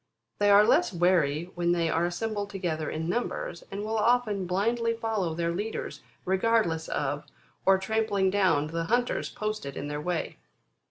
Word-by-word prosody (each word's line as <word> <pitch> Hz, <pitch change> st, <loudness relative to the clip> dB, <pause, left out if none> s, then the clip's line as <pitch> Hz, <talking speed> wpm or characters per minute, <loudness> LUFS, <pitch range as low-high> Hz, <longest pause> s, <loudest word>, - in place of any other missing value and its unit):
They 205 Hz, 0 st, +4 dB
are 205 Hz, +1 st, +7 dB
less 335 Hz, +6 st, +3 dB
wary 170 Hz, -2 st, +1 dB
when 175 Hz, 0 st, +1 dB
they 170 Hz, -1 st, +1 dB
are 165 Hz, +2 st, +1 dB
assembled 205 Hz, +3 st, -3 dB
together 170 Hz, -6 st, -3 dB
in 160 Hz, +1 st, -3 dB
numbers, 180 Hz, -4 st, -3 dB
and 200 Hz, +1 st, -5 dB
will 220 Hz, 0 st, -1 dB
often 215 Hz, -4 st, +2 dB
blindly 230 Hz, +5 st, +1 dB
follow 220 Hz, -8 st, -2 dB
their 170 Hz, 0 st, 0 dB
leaders, 210 Hz, +5 st, -4 dB, 0.2 s
regardless 190 Hz, -4 st, +1 dB
of, 145 Hz, +1 st, -2 dB, 0.4 s
or 195 Hz, 0 st, +7 dB
trampling 200 Hz, -2 st, +1 dB
down 185 Hz, -7 st, +3 dB
the 165 Hz, +2 st, -3 dB
hunters 240 Hz, +5 st, 0 dB
posted 215 Hz, -10 st, -4 dB
in 145 Hz, -, -4 dB
their 150 Hz, 0 st, -3 dB
way. 175 Hz, +1 st, -3 dB
190 Hz, 160 wpm, -28 LUFS, 165-215 Hz, 0.4 s, are